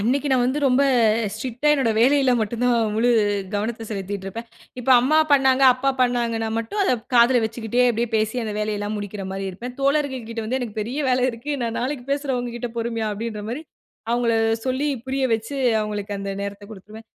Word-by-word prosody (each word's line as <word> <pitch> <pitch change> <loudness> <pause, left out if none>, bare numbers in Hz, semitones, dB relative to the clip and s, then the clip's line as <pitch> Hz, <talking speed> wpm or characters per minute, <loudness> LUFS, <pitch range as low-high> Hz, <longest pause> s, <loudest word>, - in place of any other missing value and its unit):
அன்னக்கி 265 +7 0
நான் 255 -2 +3
வந்து 260 +4 0
ரொம்ப 265 0 +4 0.5
ஸ்ட்ரிக்ட்டா 245 +6 -2
என்னோட 265 -6 +2
வேலையில 265 +2 +4
மட்டும் 225 +3 -2
தான் 245 -1 +3 0.2
முழு 230 +3 +2 0.5
கவனத்த 225 +2 -3
செலுத்திட்டு 200 -2 -5
இருப்பேன். 230 +4 -6 0.3
இப்ப 260 - -1
அம்மா 305 +6 +3
பண்ணாங்க, 265 -1 +4
அப்பா 270 +2 0
பண்ணாங்கன்னா 235 -3 +1
மட்டும் 230 - -3
அத 380 - +2 0.2
காதுல 240 0 +5
வச்சுக்கிட்டே 225 +2 -1
அப்பிடியே 235 0 0
பேசி 220 +3 0
அந்த 215 - -3
வேலையெல்லாம் 210 0 -2
முடிக்கிறமாரி 195 -1 -5
இருப்பேன். 245 +7 -8
தோழர்கள்கிட்டே 265 -6 -1
வந்து 250 +4 -1
"எனக்கு 230 -3 -6
பெரிய 245 +7 -4
வேலை 255 0 +2
இருக்கு 235 +5 -7
நான் 230 -1 -2
நாளைக்கு 255 0 -3
பேசுற 280 -2 -1
உங்ககிட்ட 240 0 -4
பொறுமையா" 230 -1 -2
அப்பிடின்றமாரி 225 +5 -5 0.5
அவுங்கள 240 -1 +1 0.3
சொல்லி 260 +3 0 0.2
புரிய 265 0 -1
வச்சு, 225 +6 -5 0.2
அவுங்களுக்கு 210 -1 -4
அந்த 195 0 -4
நேரத்த 200 0 -6
கொடுத்துருவேன். 215 +2 -12
235 Hz, 165 wpm, -22 LUFS, 215-255 Hz, 0.5 s, காதுல